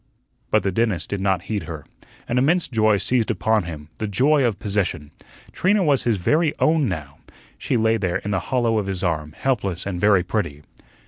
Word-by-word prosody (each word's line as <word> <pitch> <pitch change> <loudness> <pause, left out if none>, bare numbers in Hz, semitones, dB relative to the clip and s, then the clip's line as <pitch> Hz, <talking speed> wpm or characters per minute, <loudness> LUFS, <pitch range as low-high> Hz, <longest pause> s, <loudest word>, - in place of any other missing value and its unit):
But - - +2
the 95 - 0
dentist 110 -2 -1
did 100 -2 -2
not 95 -3 +1
heed 100 -4 -3
her. 80 -2 -7 0.4
An 125 - +1
immense 165 +7 +2
joy 110 -4 +2
seized 120 +2 0
upon 110 -4 +1
him 75 -3 -8
the 110 - -2
joy 135 +8 +3
of 115 -5 +1
possession. 95 -8 -2 0.4
Trina 200 +2 +2
was 145 -5 +2
his 115 -4 +2
very 150 - +1
own 155 -5 +2
now. 75 -6 -6 0.4
She - - 0
lay 110 0 +2
there 90 -3 -1
in 105 - -5
the 95 - +1
hollow 120 -4 +2
of 100 - -3
his 95 -1 -3
arm, 75 -4 -2
helpless 100 -9 -1
and 90 -3 -4
very 100 -3 +4
pretty. 85 -7 -3
105 Hz, 195 wpm, -22 LUFS, 90-120 Hz, 0.4 s, very